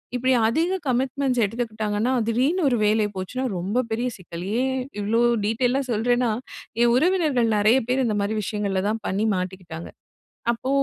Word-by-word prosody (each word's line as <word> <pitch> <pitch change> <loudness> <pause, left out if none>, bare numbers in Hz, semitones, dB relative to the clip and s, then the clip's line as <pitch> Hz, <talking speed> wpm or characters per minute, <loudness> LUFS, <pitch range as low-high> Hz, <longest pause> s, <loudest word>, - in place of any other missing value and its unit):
இப்படி 255 +1 +1 0.2
அதிக 335 +11 +1
கமிட்மெண்ட்ஸ் 260 0 0
எடுத்துக்கிட்டாங்கன்னா, 220 +1 -2 0.2
திடீர்னு 270 +11 +1
ஒரு 245 - +1
வேலை 215 +1 +3
போச்சுன்னா, 190 +8 -3
ரொம்ப 200 +8 0
பெரிய 235 +3 0
சிக்கல். 170 -2 -8 0.2
ஏன், 260 0 0 0.2
இவ்ளோ 215 +3 +1 0.3
டீட்டெய்லா 245 +5 +1
சொல்றேன்னா, 240 +2 +1 0.5
என் 240 0 +5
உறவினர்கள் 290 -7 +2
நெறைய 215 +5 +4
பேர் 260 +1 +2
இந்த 215 -3 0
மாரி 205 +2 -1
விஷயங்கள்ல 200 -2 -1
தான் 220 0 -3
பண்ணி 200 +3 0
மாட்டிக்கிட்டாங்க. 180 -3 -5 0.6
அப்போ, 245 +3 -5
230 Hz, 145 wpm, -24 LUFS, 210-255 Hz, 0.6 s, என்